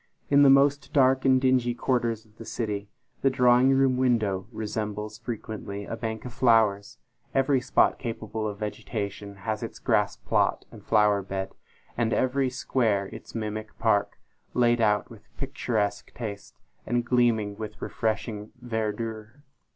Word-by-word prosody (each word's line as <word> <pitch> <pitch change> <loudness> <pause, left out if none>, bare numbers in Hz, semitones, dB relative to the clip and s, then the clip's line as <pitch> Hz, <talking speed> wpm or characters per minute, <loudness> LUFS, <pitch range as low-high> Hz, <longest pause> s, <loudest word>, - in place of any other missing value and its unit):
In 140 0 +6
the 140 - +7
most 140 +1 +4
dark 130 -1 +4
and 130 -1 +5
dingy 130 -2 +2
quarters 115 -3 0
of 105 0 -26
the - - -7
city, 105 -3 -4 0.3
the 135 - +4
drawing 125 0 +4
room 135 -1 +3
window 110 -7 +1
resembles 105 -1 -4
frequently 110 -3 -6
a - - -4
bank 110 -1 -5
of 125 - -7
flowers; 110 -5 +3 0.4
every 135 -1 +3
spot 130 - +2
capable 110 -2 -4
of 105 -1 -5
vegetation 105 -1 -5
has 110 -1 -1
its - - -6
grass - - +1
plot - - 0
and - - -13
flower 105 -2 +3
bed; 95 0 -4 0.4
and 115 -1 0
every 130 +1 +1
square 115 -6 0
its - - -11
mimic 110 -1 -4
park, 105 -3 +1 0.4
laid 120 -1 +3
out 105 0 +2
with 110 -1 -14
picturesque 110 -7 -2
taste, 105 -4 -7 0.3
and 120 0 -1
gleaming 115 -4 +2
with 110 0 -7
refreshing 110 -1 -3
verdure. 110 +2 -4
115 Hz, 145 wpm, -27 LUFS, 105-125 Hz, 0.4 s, the